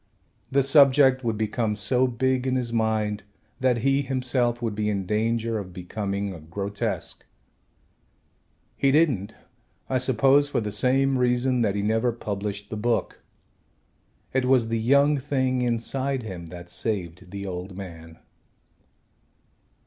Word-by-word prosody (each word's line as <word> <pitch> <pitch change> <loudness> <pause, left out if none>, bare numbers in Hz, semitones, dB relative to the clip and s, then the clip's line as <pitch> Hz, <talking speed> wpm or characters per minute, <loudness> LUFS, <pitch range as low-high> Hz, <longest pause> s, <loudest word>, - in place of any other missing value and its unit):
The 140 +1 +3
subject 135 -2 +5
would 115 -2 -1
become 110 0 -1
so 125 +5 +1
big 130 +1 0
in 130 - +1
his 120 -2 -2
mind 110 -2 0 0.4
that 125 -3 +2
he 135 +1 +3
himself 125 -3 0
would 115 -3 -2
be 105 0 -1
in 100 -2 -2
danger 115 +2 0
of 90 -3 -8
becoming 100 +2 -4
a 85 - -9
grotesque. 100 +6 -4 1.5
He 135 - +2
didn't, 135 - +2 0.5
I 130 - +1
suppose, 135 +3 +3
for - - 0
the 105 -2 -3
same 130 +5 +2
reason 125 0 +2
that 105 -3 +1
he 100 - -1
never 110 +3 +1
published 105 -2 -5
the 110 - -3
book. 115 +2 -1 1.1
It 130 -1 +1
was 125 -3 +3
the 115 0 0
young 140 +5 +4
thing 130 -2 0
inside 125 +2 -1
him 90 -6 -7
that 85 +1 -10
saved 90 -4 -4
the 100 +1 -6
old 90 0 -6
man. 80 -4 -9
115 Hz, 140 wpm, -25 LUFS, 100-130 Hz, 1.5 s, subject